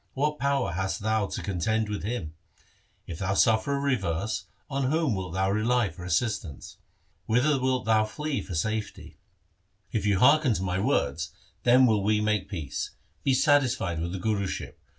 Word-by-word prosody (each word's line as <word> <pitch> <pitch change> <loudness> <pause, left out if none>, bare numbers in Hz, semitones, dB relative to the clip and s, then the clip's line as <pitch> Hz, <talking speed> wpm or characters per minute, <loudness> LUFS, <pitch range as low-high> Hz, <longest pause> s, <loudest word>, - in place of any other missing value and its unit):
What 150 +1 0
power 140 -6 +1
hast 95 +3 -2
thou 110 -1 +1
to - - -5
contend 110 +4 0
with 105 -1 -3
him? 100 -8 -4 0.7
If 80 - -7
thou 95 0 -1
suffer 110 +6 +3
a - - -1
reverse, 110 - -1 0.2
on 135 -1 -1
whom 155 -4 +1
wilt 95 -3 -4
thou 95 +1 +1
rely 110 0 +1
for 90 - -11
assistance? 90 - -2 0.5
Whither 135 +5 +3
wilt 130 -1 0
thou 110 -1 +3
flee 150 +6 -3
for 90 - -6
safety? 110 +5 -3 0.7
If 110 -4 -1
thou 100 -2 +3
hearken 140 - +5
to 95 - -2
my 90 0 -1
words, 75 -3 0 0.3
then 125 +2 +6
will 110 -4 +3
we 105 +1 +2
make 105 -2 0
peace. 80 -9 -5 0.3
Be 135 - +3
satisfied 130 - +2
with 85 +1 -3
the 95 - -4
Guruship. 100 -1 -2
110 Hz, 170 wpm, -27 LUFS, 95-130 Hz, 0.7 s, then